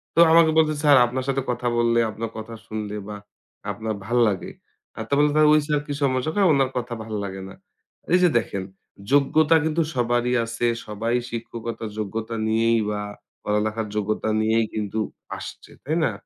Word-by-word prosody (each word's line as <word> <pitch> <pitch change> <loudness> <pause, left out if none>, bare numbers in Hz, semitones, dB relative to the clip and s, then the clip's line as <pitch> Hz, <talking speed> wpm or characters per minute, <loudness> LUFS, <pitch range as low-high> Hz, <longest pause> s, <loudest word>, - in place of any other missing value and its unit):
তো - - +2
আমাকে 165 -1 +6
বলছে, 155 -1 +4
"স্যার 145 -2 +7
আপনার 130 +2 -3
সাথে 135 0 0
কথা 120 0 -3
বললে 120 0 +3
আপনার 110 +2 -5
কথা 110 +1 -7
শুনলে 105 -1 -5
বা 105 - -6 0.6
আপনার 110 -1 -4
ভাল্লাগে।" 115 -4 +1 0.5
আর - - -3
তারপর 140 +1 +3
বলছি, 150 - +1
"তালে 155 -1 +6
ওই 155 - +6
স্যারের 150 -1 0
কি 145 - -3
সমস্যা?" 130 +2 +1
কয়, 200 -2 +4
"উনার 135 -2 +2
কথা 120 0 -3
ভাল্লাগে 100 -3 -5
না।" - - -12 0.6
এই 180 - +6
যে 180 - +6
দেখেন, 100 -3 -4 0.5
যোগ্যতা 150 +3 +4
কিন্তু 160 +1 +1
সবারই 120 0 +1
আছে। 115 +1 -3 0.2
সবাই 115 +3 -2
শিক্ষকতার 115 -1 -5
যোগ্যতা 110 +2 -4
নিয়েই 115 +1 +2
বা 105 -1 -2 0.4
পড়ালেখার 105 +1 -1
যোগ্যতা 105 +1 -1
নিয়েই 110 +1 +2
কিন্তু 110 0 -3 0.4
আসছে। - - -10
তাই 155 +4 -1
না? - - +1
115 Hz, 170 wpm, -23 LUFS, 110-140 Hz, 0.6 s, স্যার